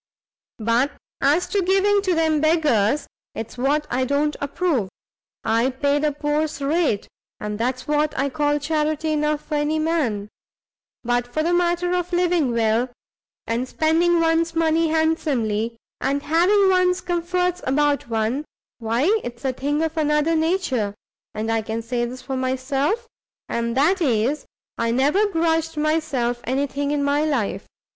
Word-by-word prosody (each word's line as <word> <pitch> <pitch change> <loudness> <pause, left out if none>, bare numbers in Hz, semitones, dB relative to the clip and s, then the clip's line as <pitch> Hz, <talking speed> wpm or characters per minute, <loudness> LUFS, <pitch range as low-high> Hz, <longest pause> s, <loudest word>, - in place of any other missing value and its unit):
But 235 +5 +1 0.3
as 300 +6 +3
to 405 - +1
giving 390 +2 +3
to 370 -3 +1
them 315 -2 +2
beggars, 295 -6 +2 0.3
it's 225 0 -6
what 285 +4 +1
I 255 +1 +1
don't 285 +3 0
approve; 285 - 0 0.5
I 230 +3 +2
pay 280 +2 0
the 300 0 +1
poor's 295 +1 -1
rate, 285 -6 0 0.3
and 210 0 -4
that's 255 +4 -2
what 300 +1 +1
I 275 - +1
call 295 +1 +1
charity 310 +1 -1
enough 300 0 0
for 310 - -6
any 295 +1 +1
man. 300 -11 0 0.8
But 245 0 -1
for 310 +4 0
the 345 +2 +1
matter 350 0 +1
of 360 0 -1
living 350 -6 +2
well, 230 +2 +1 0.6
and 235 +3 -1
spending 335 +4 +2
one's 330 0 +1
money 325 0 +2
handsomely, 270 -9 0 0.2
and 280 +1 -1
having 380 +6 +4
one's 365 -1 +3
comforts 360 +1 -1
about 285 -1 +1
one, 225 +5 0 0.4
why 230 +2 0 0.2
it's 240 +2 -7
a 260 - +1
thing 290 +4 -1
of 320 0 -2
another 300 +1 +2
nature, 315 - 0 0.4
and 220 +1 -2
I 225 0 +1
can 220 +1 -4
say 240 +1 -1
this 250 +1 -8
for 265 0 -4
myself, 270 - -1 0.4
and 235 +1 -2
that 350 +7 +3
is, 255 0 +1 0.3
I 230 0 +1
never 290 - +3
grudged 325 -3 0
myself 300 -6 0
any 265 +4 0
thing 285 +1 -3
in 290 -1 0
my 285 +1 +2
life. 235 -10 -1
295 Hz, 150 wpm, -22 LUFS, 250-325 Hz, 0.8 s, having